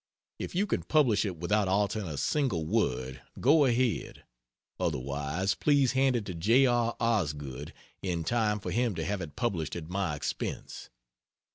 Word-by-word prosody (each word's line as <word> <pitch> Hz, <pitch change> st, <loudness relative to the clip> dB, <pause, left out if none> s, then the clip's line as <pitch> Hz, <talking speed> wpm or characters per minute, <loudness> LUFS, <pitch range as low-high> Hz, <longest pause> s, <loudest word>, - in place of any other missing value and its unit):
If -, -, -5 dB
you 195 Hz, +3 st, +2 dB
can -, -, -1 dB
publish 125 Hz, -10 st, +3 dB
it 95 Hz, -4 st, -3 dB
without 100 Hz, +5 st, +1 dB
altering 100 Hz, +1 st, 0 dB
a 75 Hz, -3 st, -5 dB
single 115 Hz, -, 0 dB
word, 65 Hz, -, -1 dB, 0.2 s
go 145 Hz, +3 st, +5 dB
ahead. 125 Hz, -2 st, 0 dB, 0.6 s
Otherwise, 70 Hz, +8 st, -1 dB
please 140 Hz, -1 st, +3 dB
hand 130 Hz, 0 st, +3 dB
it 115 Hz, -4 st, -1 dB
to 95 Hz, -, -5 dB
J. 115 Hz, +11 st, +4 dB
R. 120 Hz, -2 st, +2 dB
Osgood 75 Hz, -, -1 dB, 0.3 s
in 85 Hz, -3 st, -2 dB
time 105 Hz, +1 st, +1 dB
for 90 Hz, -2 st, -5 dB
him 115 Hz, 0 st, +1 dB
to 80 Hz, -1 st, -3 dB
have 100 Hz, -1 st, -2 dB
it 75 Hz, -4 st, -7 dB
published 90 Hz, -8 st, -2 dB
at 85 Hz, -2 st, -6 dB
my 95 Hz, -5 st, -1 dB
expense. 75 Hz, -, -5 dB
100 Hz, 160 wpm, -29 LUFS, 80-120 Hz, 0.6 s, go